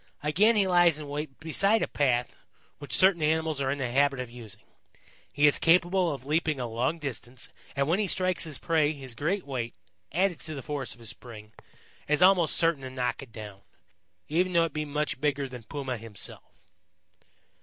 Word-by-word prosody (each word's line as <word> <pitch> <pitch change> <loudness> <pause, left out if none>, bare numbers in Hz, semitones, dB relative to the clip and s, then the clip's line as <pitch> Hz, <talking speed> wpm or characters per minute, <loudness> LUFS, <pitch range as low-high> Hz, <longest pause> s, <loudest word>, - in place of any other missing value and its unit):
Again 195 +10 +4
he 205 -2 +4
lies 175 -3 +4
in 150 -1 -7
wait 145 -1 -5
beside 195 +7 +2
a - - 0
path 125 -4 0 0.4
which 145 -3 -1
certain 185 -3 +5
animals 155 -1 +1
are 135 - 0
in 140 - -1
the 125 -3 -3
habit 140 +1 +2
of 125 -2 -5
using. 110 -3 -11 0.7
He 145 +1 +2
is 145 - +5
capable 175 +1 +3
of 135 -3 -7
leaping 155 -1 0
a 125 - -2
long 120 +7 -1
distance, 130 -4 -5 0.3
and 140 0 +1
when 170 +5 +2
he 210 - +1
strikes 185 0 +1
his 155 -3 -5
prey 155 -2 +1
his 135 -4 -8
great 170 - -2
weight, 125 -6 -4 0.4
added 180 +2 +1
to 155 -1 -5
the 135 - -7
force 145 -4 -4
of - - -23
his 115 - -5
spring, 110 -4 -11 0.6
is 150 +4 +3
almost 180 -4 +5
certain 165 -4 +2
to 130 - -6
knock 125 0 -2
it 135 -4 -12
down, 105 -3 -9 0.7
even 180 +4 +1
though 170 -1 +4
it 165 - -6
be 150 0 -2
much 150 -2 -2
bigger 140 -2 0
than 125 -2 -9
Puma 135 -2 -4
himself. 110 -3 -5
145 Hz, 195 wpm, -28 LUFS, 130-165 Hz, 0.7 s, certain